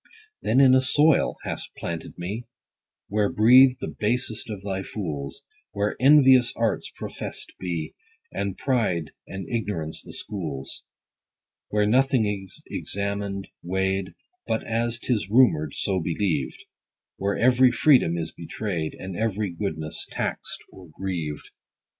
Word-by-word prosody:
Then 130 Hz, -, +2 dB
in 135 Hz, -2 st, +7 dB
a 130 Hz, -, +6 dB
soil 145 Hz, +4 st, +4 dB
hast -, -, -5 dB
planted 85 Hz, -1 st, -6 dB
me, 100 Hz, +7 st, -5 dB, 0.6 s
Where 105 Hz, 0 st, +1 dB
breathe 125 Hz, +4 st, +7 dB
the -, -, -4 dB
basest 115 Hz, +1 st, -1 dB
of 100 Hz, -3 st, -6 dB
thy 95 Hz, -1 st, -2 dB
fools, 75 Hz, -10 st, -5 dB, 0.3 s
Where 100 Hz, +1 st, 0 dB
envious 130 Hz, -3 st, +6 dB
arts 115 Hz, -1 st, 0 dB
professed -, -, -6 dB
be, 85 Hz, -4 st, -3 dB, 0.4 s
And 100 Hz, -1 st, -3 dB
pride 100 Hz, -, 0 dB, 0.2 s
and 95 Hz, -1 st, -6 dB
ignorance 100 Hz, -9 st, -3 dB
the -, -, -11 dB
schools: 75 Hz, -10 st, -4 dB, 0.9 s
Where 105 Hz, 0 st, +2 dB
nothing 125 Hz, +1 st, +3 dB
is 100 Hz, -2 st, -4 dB
examin'd, 100 Hz, -1 st, -3 dB
weigh'd, 95 Hz, +1 st, -1 dB, 0.3 s
But 110 Hz, -, -1 dB
as 115 Hz, +1 st, 0 dB
'tis 115 Hz, -4 st, -1 dB
rumour'd, 100 Hz, -, +4 dB
so 95 Hz, -2 st, 0 dB
believed; 80 Hz, -4 st, -1 dB
50 -, -, -17 dB, 0.5 s
Where 100 Hz, +1 st, -1 dB
every 130 Hz, +1 st, +5 dB
freedom 125 Hz, -, +4 dB
is 80 Hz, -1 st, -3 dB
betray'd, 85 Hz, -2 st, -4 dB
And 95 Hz, -1 st, -6 dB
every 105 Hz, -1 st, -1 dB
goodness 80 Hz, -4 st, -4 dB
tax'd -, -, -3 dB
or 90 Hz, -3 st, -14 dB
grieved. 85 Hz, -6 st, -4 dB
100 Hz, 130 wpm, -25 LUFS, 90-120 Hz, 0.9 s, in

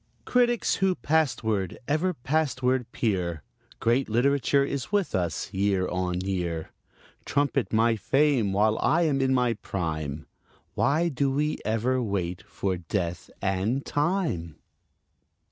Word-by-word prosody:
Critics, 240 Hz, -1 st, +2 dB
who 190 Hz, -1 st, +2 dB
pastward, 110 Hz, -, 0 dB
ever 160 Hz, +5 st, +1 dB
pastward 130 Hz, -3 st, 0 dB
peer, 90 Hz, -, -1 dB, 0.4 s
Great 120 Hz, +3 st, +1 dB
literature 140 Hz, +4 st, +2 dB
is 140 Hz, +2 st, -4 dB
with 205 Hz, -3 st, +1 dB
us 90 Hz, +1 st, -2 dB
year 95 Hz, -1 st, +1 dB
on 90 Hz, 0 st, -1 dB
year. 90 Hz, -4 st, -3 dB, 0.5 s
Trumpet 140 Hz, -2 st, 0 dB
my 115 Hz, +1 st, +3 dB
fame 125 Hz, 0 st, +2 dB
while 105 Hz, +2 st, +2 dB
I 170 Hz, +2 st, +3 dB
am 140 Hz, -4 st, +1 dB
in 130 Hz, 0 st, +2 dB
my 125 Hz, -2 st, +2 dB
prime: 80 Hz, -7 st, -4 dB, 0.5 s
Why 155 Hz, +5 st, +2 dB
do 140 Hz, -1 st, 0 dB
we 150 Hz, +3 st, 0 dB
ever 120 Hz, +4 st, 0 dB
wait 90 Hz, -5 st, -2 dB
for 95 Hz, -2 st, -2 dB
Death 85 Hz, 0 st, -3 dB
and 100 Hz, +8 st, 0 dB
Time? 145 Hz, -, -1 dB
115 Hz, 125 wpm, -27 LUFS, 95-140 Hz, 0.5 s, my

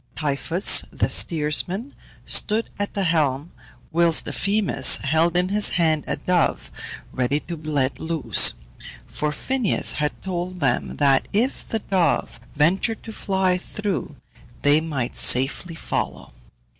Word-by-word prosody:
Typhus, 155 Hz, +5 st, +3 dB
the -, -, -1 dB
steersman, 175 Hz, -, +1 dB, 0.3 s
stood 220 Hz, +2 st, 0 dB
at 205 Hz, -, -3 dB
the 200 Hz, -, -1 dB
helm, 155 Hz, -3 st, 0 dB, 0.4 s
whilst 170 Hz, 0 st, +3 dB
Euphemus 200 Hz, -9 st, +2 dB
held 160 Hz, +5 st, 0 dB
in 180 Hz, +1 st, +1 dB
his 205 Hz, +1 st, +4 dB
hand 160 Hz, -3 st, +2 dB
a -, -, -1 dB
dove 180 Hz, -3 st, -1 dB, 0.4 s
ready 130 Hz, +3 st, -1 dB
to 170 Hz, -, -7 dB
be 155 Hz, -1 st, -9 dB
let 140 Hz, -3 st, -1 dB
loose; 160 Hz, -2 st, +2 dB, 0.5 s
for 150 Hz, -, -3 dB
Phineus 250 Hz, -, +1 dB
had 150 Hz, 0 st, -3 dB
told 180 Hz, -1 st, -5 dB
them 135 Hz, -5 st, -1 dB
that 135 Hz, -2 st, +2 dB
if 235 Hz, +7 st, -1 dB
the 225 Hz, -, -1 dB
dove 180 Hz, -, -1 dB, 0.2 s
ventured 185 Hz, +9 st, 0 dB
to 225 Hz, -, -9 dB
fly 190 Hz, -3 st, -1 dB
through, 195 Hz, -6 st, -4 dB, 0.5 s
they 145 Hz, +2 st, +4 dB
might 140 Hz, -7 st, -4 dB
safely 140 Hz, +7 st, +2 dB
follow. -, -, -5 dB
165 Hz, 130 wpm, -22 LUFS, 150-190 Hz, 0.5 s, his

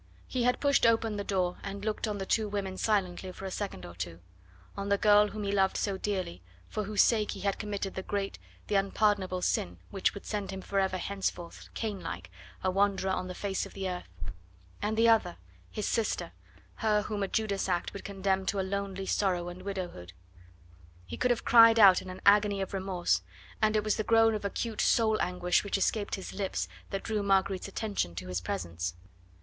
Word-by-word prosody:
He 255 Hz, -, -2 dB
had 250 Hz, -, +2 dB
pushed 280 Hz, -4 st, +4 dB
open 225 Hz, -2 st, +2 dB
the 200 Hz, -, -2 dB
door 185 Hz, -3 st, 0 dB
and 200 Hz, +1 st, -6 dB
looked 215 Hz, +1 st, -1 dB
on 210 Hz, -1 st, -2 dB
the 195 Hz, -, -3 dB
two 215 Hz, +1 st, +1 dB
women 195 Hz, -2 st, -3 dB
silently 185 Hz, -3 st, 0 dB
for 195 Hz, -, -9 dB
a 190 Hz, -, -4 dB
second 195 Hz, -, -4 dB
or 85 Hz, -, -9 dB
two; 85 Hz, -1 st, -6 dB, 0.6 s
on 200 Hz, 0 st, -4 dB
the 200 Hz, -, +4 dB
girl 210 Hz, 0 st, +6 dB
whom 210 Hz, 0 st, -5 dB
he 200 Hz, -, -1 dB
loved 195 Hz, -1 st, +2 dB
so 200 Hz, -2 st, 0 dB
dearly, 190 Hz, -, -3 dB, 0.3 s
for 215 Hz, -, -3 dB
whose 210 Hz, 0 st, +4 dB
sake 215 Hz, -3 st, +2 dB
he 195 Hz, -, -8 dB
had 200 Hz, 0 st, 0 dB
committed 200 Hz, -2 st, -3 dB
the 190 Hz, -, -4 dB
great, 195 Hz, 0 st, -3 dB, 0.3 s
the -, -, -4 dB
unpardonable 195 Hz, -2 st, +1 dB
sin 90 Hz, 0 st, 0 dB
which 195 Hz, -, +1 dB
would 200 Hz, -, -8 dB
send 205 Hz, -2 st, -3 dB
him 190 Hz, -, -5 dB
forever 190 Hz, -1 st, 0 dB
henceforth, 185 Hz, -3 st, -4 dB
Cain 215 Hz, -4 st, -3 dB
like, 95 Hz, -, -6 dB, 0.3 s
a 185 Hz, -, +2 dB
wanderer 195 Hz, 0 st, +2 dB
on 185 Hz, 0 st, -1 dB
the 180 Hz, -, -6 dB
face 195 Hz, 0 st, -2 dB
of -, -, -17 dB
the 195 Hz, -1 st, -3 dB
earth; 180 Hz, -, -5 dB, 0.7 s
and 215 Hz, +1 st, -1 dB
the 230 Hz, +1 st, +5 dB
other, 215 Hz, -6 st, +3 dB, 0.3 s
his 210 Hz, -, -3 dB
sister, 225 Hz, -3 st, -1 dB, 0.5 s
her 210 Hz, -1 st, +2 dB
whom 210 Hz, -1 st, -3 dB
a 195 Hz, -, +1 dB
Judas 200 Hz, -2 st, -1 dB
act 175 Hz, -1 st, -1 dB
would 200 Hz, -, -7 dB
condemn 195 Hz, -1 st, -1 dB
to 200 Hz, -, 0 dB
lonely 195 Hz, 0 st, -2 dB
sorrow 180 Hz, -3 st, 0 dB
and 175 Hz, +1 st, -9 dB
widowhood. 180 Hz, -, -5 dB, 0.9 s
He 90 Hz, -, -6 dB
could 250 Hz, -, +1 dB
have 240 Hz, -2 st, 0 dB
cried 230 Hz, -1 st, +8 dB
out 195 Hz, -4 st, +8 dB
in 185 Hz, -, -9 dB
an 185 Hz, -, -8 dB
agony 205 Hz, 0 st, +5 dB
of 195 Hz, 0 st, -3 dB
remorse, 190 Hz, -2 st, 0 dB, 0.4 s
and 215 Hz, 0 st, +3 dB
it 210 Hz, -, +2 dB
was 215 Hz, -1 st, +1 dB
the 215 Hz, -, 0 dB
groan 225 Hz, 0 st, +5 dB
of 210 Hz, -, -3 dB
acute 215 Hz, +2 st, -2 dB
soul 220 Hz, -2 st, +3 dB
anguish 180 Hz, 0 st, +1 dB
which 200 Hz, -1 st, -1 dB
escaped 205 Hz, +1 st, 0 dB
his 190 Hz, -, -7 dB
lips 190 Hz, -, -2 dB, 0.2 s
that 195 Hz, -, -3 dB
drew 215 Hz, -2 st, -1 dB
Marguerite's 195 Hz, -1 st, +1 dB
attention 195 Hz, -, -2 dB
to 90 Hz, +1 st, -6 dB
his 90 Hz, -1 st, -2 dB
presence. 85 Hz, -1 st, -3 dB
195 Hz, 205 wpm, -30 LUFS, 185-210 Hz, 0.9 s, cried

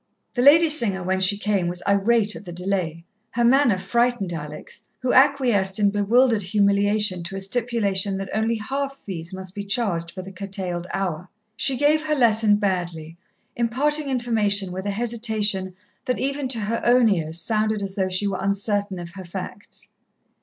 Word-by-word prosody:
The 245 Hz, -, 0 dB
lady 310 Hz, +5 st, +7 dB
singer, 225 Hz, -, +2 dB
when 190 Hz, +1 st, 0 dB
she 190 Hz, +2 st, +3 dB
came, 205 Hz, -4 st, 0 dB
was 175 Hz, +1 st, -4 dB
irate 210 Hz, +2 st, +2 dB
at -, -, -9 dB
the 180 Hz, -, -9 dB
delay. 175 Hz, -2 st, -3 dB, 0.3 s
Her 240 Hz, -, +1 dB
manner 245 Hz, -4 st, +4 dB
frightened 210 Hz, -1 st, 0 dB
Alex, 150 Hz, -2 st, -8 dB, 0.2 s
who 255 Hz, -, +1 dB
acquiesced 250 Hz, -9 st, +3 dB
in 205 Hz, -1 st, +3 dB
bewildered 225 Hz, +3 st, +3 dB
humiliation 200 Hz, 0 st, +1 dB
to 175 Hz, +3 st, -7 dB
a -, -, -3 dB
stipulation 200 Hz, -2 st, -1 dB
that 195 Hz, -1 st, -6 dB
only 220 Hz, +2 st, 0 dB
half 275 Hz, +5 st, -4 dB
fees 170 Hz, -6 st, -7 dB
must 185 Hz, -1 st, -8 dB
be 200 Hz, -, -5 dB
charged 195 Hz, -5 st, -1 dB
for 185 Hz, +1 st, -8 dB
the 190 Hz, -, -9 dB
curtailed 185 Hz, -3 st, -5 dB
hour. 180 Hz, -2 st, -3 dB, 0.3 s
She 260 Hz, +2 st, +1 dB
gave 295 Hz, +2 st, +3 dB
her 305 Hz, -, +1 dB
lesson 220 Hz, -5 st, +4 dB
badly, 175 Hz, -5 st, -3 dB, 0.4 s
imparting 280 Hz, +5 st, 0 dB
information 215 Hz, -6 st, 0 dB
with 190 Hz, +2 st, -5 dB
a -, -, 0 dB
hesitation 215 Hz, -4 st, -1 dB, 0.3 s
that 250 Hz, -, -1 dB
even 275 Hz, 0 st, -1 dB
to 240 Hz, -3 st, -1 dB
her 220 Hz, +3 st, -2 dB
own 245 Hz, 0 st, +5 dB
ears 165 Hz, -5 st, 0 dB
sounded 215 Hz, 0 st, 0 dB
as 195 Hz, -1 st, -5 dB
though 190 Hz, -2 st, -1 dB
she 185 Hz, +2 st, +1 dB
were 195 Hz, -2 st, -2 dB
uncertain 200 Hz, 0 st, -1 dB
of 170 Hz, -1 st, -8 dB
her 190 Hz, +1 st, -9 dB
facts. 190 Hz, +3 st, -9 dB
205 Hz, 175 wpm, -23 LUFS, 190-235 Hz, 0.4 s, lady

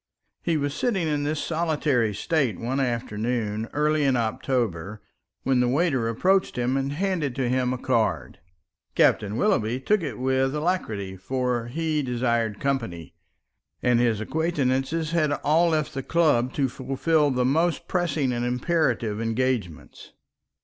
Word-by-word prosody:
He 165 Hz, -2 st, 0 dB
was 145 Hz, -1 st, -1 dB
sitting 195 Hz, -, 0 dB
in 145 Hz, -1 st, 0 dB
this 150 Hz, +1 st, -1 dB
solitary 150 Hz, -8 st, 0 dB
state 135 Hz, -, 0 dB
one 130 Hz, +4 st, -2 dB
afternoon 115 Hz, -3 st, -2 dB
early 150 Hz, +1 st, +1 dB
in 135 Hz, -2 st, +3 dB
October, 110 Hz, -5 st, -1 dB, 0.4 s
when 130 Hz, -2 st, +2 dB
the 125 Hz, -, +3 dB
waiter 135 Hz, -4 st, +1 dB
approached 185 Hz, -, +1 dB
him 125 Hz, +2 st, 0 dB
and 135 Hz, +1 st, -1 dB
handed 165 Hz, -6 st, -1 dB
to 130 Hz, -2 st, 0 dB
him 125 Hz, 0 st, +1 dB
a 130 Hz, -, -2 dB
card. 110 Hz, -3 st, -1 dB, 0.6 s
Captain 105 Hz, 0 st, +3 dB
Willoughby 125 Hz, -, +1 dB
took 210 Hz, +9 st, +1 dB
it 140 Hz, -10 st, -4 dB
with 130 Hz, +2 st, +1 dB
alacrity, 110 Hz, -, -2 dB
for 125 Hz, +3 st, -2 dB
he 155 Hz, +3 st, -1 dB
desired 120 Hz, -4 st, -1 dB
company, 115 Hz, -, -3 dB, 0.7 s
and 125 Hz, -1 st, +3 dB
his 115 Hz, -3 st, +2 dB
acquaintances 150 Hz, +2 st, -1 dB
had 155 Hz, -3 st, +2 dB
all 165 Hz, +3 st, +4 dB
left 155 Hz, -2 st, 0 dB
the 135 Hz, -, -3 dB
club 140 Hz, -6 st, +2 dB
to 140 Hz, -2 st, +1 dB
fulfil 140 Hz, +4 st, +1 dB
the 125 Hz, -2 st, +1 dB
most 165 Hz, +5 st, +1 dB
pressing 155 Hz, -7 st, 0 dB
and 120 Hz, 0 st, -2 dB
imperative 125 Hz, -4 st, 0 dB
engagements. 115 Hz, -, -3 dB
130 Hz, 140 wpm, -25 LUFS, 120-155 Hz, 0.7 s, all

